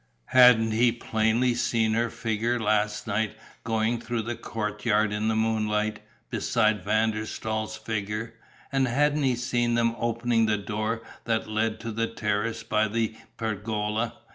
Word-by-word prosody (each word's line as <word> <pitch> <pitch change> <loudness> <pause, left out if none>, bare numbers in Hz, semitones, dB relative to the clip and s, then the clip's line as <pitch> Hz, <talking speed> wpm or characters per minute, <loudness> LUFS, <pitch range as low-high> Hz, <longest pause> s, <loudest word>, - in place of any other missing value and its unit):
Hadn't 125 -3 +7
he 120 +2 +4
plainly 115 +2 +1
seen 115 -2 +1
her 115 +1 +1
figure 115 +2 -1
last 105 -1 +1
night 105 +1 -1 0.3
going 115 +1 0
through 120 -1 -2
the 120 +2 -3
courtyard 105 -1 -1
in 105 +1 -1
the 110 - +1
moonlight, 110 -1 0 0.3
beside 110 -3 +1
Van 110 +3 +2
der 110 0 -3
Staal's 110 0 -3
figure, 110 +1 -3 0.4
and 135 -1 +2
hadn't 145 +4 +2
he 130 -3 +2
seen 120 -1 0
them 115 0 +2
opening 115 -1 +1
the 105 -1 +2
door 110 +3 -3 0.2
that 115 -1 0
led 110 +1 -1
to 115 - -4
the 115 +1 -1
terrace 110 +1 -2
by 110 -1 +1
the 110 0 -1 0.2
pergola? 110 +1 -2
110 Hz, 150 wpm, -26 LUFS, 110-115 Hz, 0.4 s, Hadn't